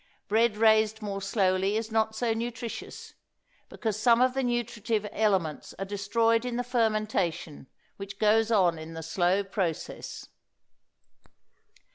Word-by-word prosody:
Bread 220 +1 +2
raised 220 0 +3
more 200 -1 -4
slowly 195 0 +1
is 220 0 -4
not 220 0 +1
so 230 0 0
nutritious, 230 0 -6 0.6
because 220 -2 -3
some 235 -1 +5
of 255 0 +3
the 270 - 0
nutritive 230 -3 -1
elements 190 -8 0
are 195 - -3
destroyed 225 +4 +1
in 250 -1 -3
the 245 - -1
fermentation 215 - -1 0.3
which 195 0 -8
goes 220 +1 +3
on 180 -7 +3
in 160 +1 -9
the 165 - -6
slow 180 +4 +1
process. 190 -5 -4
215 Hz, 130 wpm, -28 LUFS, 195-230 Hz, 0.6 s, some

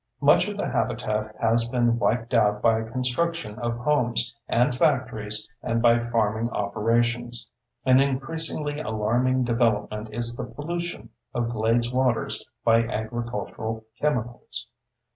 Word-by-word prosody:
Much - - +5
of - - -5
the - - -1
habitat 110 0 -1
has 115 +1 +2
been 120 -1 +1
wiped 115 +1 0
out 105 -3 +3
by 115 0 +3
construction 125 +2 -2
of 120 -1 -2
homes 120 -3 +1
and 125 +1 +2
factories 125 -8 +1
and 115 - 0
by 120 0 +5
farming 115 -1 0
operations. 115 +3 0 0.3
An 130 0 +6
increasingly 145 +2 -1
alarming 125 +1 +1
development 110 -3 0
is 120 +1 -1
the - - -4
pollution 170 +3 -5 0.3
of 120 -1 0
glades 115 +2 +1
waters 125 -4 +1 0.2
by 115 0 +5
agricultural 115 -1 -4 0.2
chemicals. 120 -6 -2
120 Hz, 125 wpm, -25 LUFS, 110-125 Hz, 0.3 s, An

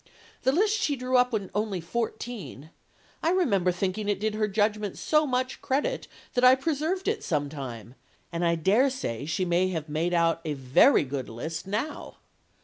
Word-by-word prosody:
The 260 - +3
list 420 +7 +2
she 290 - +1
drew 255 0 -2
up 250 0 +3
when 205 -5 -3
only 205 -2 -1
fourteen 215 - -5 0.5
I 325 - +2
remember 205 - +2
thinking 195 +3 -2
it 200 -2 0
did 215 +1 -1
her 215 0 0
judgment 210 0 0
so 305 -1 +2
much 255 0 -1
credit, 295 - -1 0.3
that 250 - +1
I 255 +1 +8
preserved 320 +7 -2
it 435 +1 0
some 145 -3 -1
time, 125 -6 -7 0.4
and 170 0 -2
I 170 0 +3
dare 205 - +3
say 140 - -4
she 160 +4 0
may 175 +1 +2
have 165 -4 -3
made 165 +4 0
out 165 -1 +2
a 155 -2 -2
very 135 - +4
good 135 -1 -4
list 160 +10 -5
now. 225 +10 -4
205 Hz, 180 wpm, -27 LUFS, 165-255 Hz, 0.5 s, I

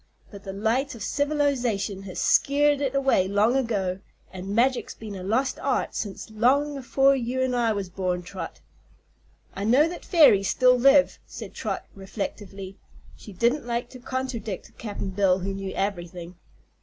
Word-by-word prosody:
But 200 -2 -11
the 195 - -4
light 235 +7 -1
o' - - -9
Civilization 250 -6 0
has 185 - -6
skeered 290 0 +3
it 275 -1 -1
away 270 -9 +3
long 205 +5 +2
ago, 200 -8 -1 0.3
an' 190 +2 -5
magic's 255 +2 +1
been 215 -2 -8
a 190 - -7
lost 230 +8 0
art 275 -2 -1
since 210 +1 -5
long 275 +7 +2
afore 275 +1 +3
you 255 0 -2
an' 260 -1 0
I 235 -2 +2
was 200 -2 -3
born, 180 -1 -2
Trot." 185 +2 -8 0.9
"I 195 - -5
know 255 +9 +4
that 345 +1 -7
fairies 280 - +5
still 255 -1 +5
live," 275 +3 +4
said - - -9
Trot, - - -4
reflectively. 195 0 -7 0.4
She 210 - -12
didn't 235 +7 0
like 235 0 -2
to 255 - -11
contradict 245 -6 -5
Cap'n 205 -3 -5
Bill, 190 -1 +3
who 195 +1 -3
knew 195 0 -5
"ever'thing." 175 -3 -4
225 Hz, 160 wpm, -25 LUFS, 195-265 Hz, 0.9 s, fairies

